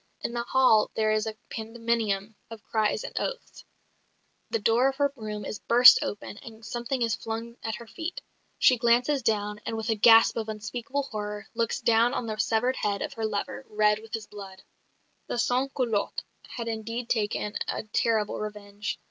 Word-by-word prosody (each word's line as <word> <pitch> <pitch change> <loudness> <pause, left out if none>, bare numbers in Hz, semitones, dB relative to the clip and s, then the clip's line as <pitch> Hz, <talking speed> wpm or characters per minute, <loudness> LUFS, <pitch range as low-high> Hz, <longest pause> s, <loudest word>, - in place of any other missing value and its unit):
In - - -3
the 240 - -1
hall 240 -3 +4
there 215 -1 +2
is 215 +1 +1
a 220 0 -5
pandemonium 225 -2 -2 0.2
of 225 -2 -10
cries 215 - 0
and - - -8
oaths; - - -5 0.9
the 460 - +1
door 245 - +3
of 270 - -5
her 285 0 +1
room 210 -3 -6
is 210 - -5
burst 245 +1 +8
open, 205 0 -5
and 225 -1 -12
something 240 +3 -2
is 230 -2 +1
flung 230 +1 -5
at 225 -1 -3
her 235 - -10
feet. 330 - -6 0.4
She 250 -2 +5
glances 245 +4 +3
down; 210 -2 -1
and, 225 - -3
with 220 0 -1
a - - +2
gasp 225 +2 +6
of 220 -1 -3
unspeakable 240 +6 -3
horror, 210 -5 -5
looks 230 -1 -1
down 235 +2 +3
on 245 - -2
the 215 -1 -4
severed 245 +4 +1
head 200 -1 -1
of - - -5
her 225 -1 -2
lover, 210 +5 -4
red 210 0 +3
with 220 0 -6
his 220 -1 -6
blood. 195 -2 -11 0.6
The - - -3
sans 250 +3 +1
culottes 230 -6 -1 0.3
had 235 -2 -5
indeed 230 +2 -4
taken 210 -2 -1
a - - -2
terrible 215 0 0
revenge. 210 -1 -5
225 Hz, 180 wpm, -27 LUFS, 210-240 Hz, 0.9 s, burst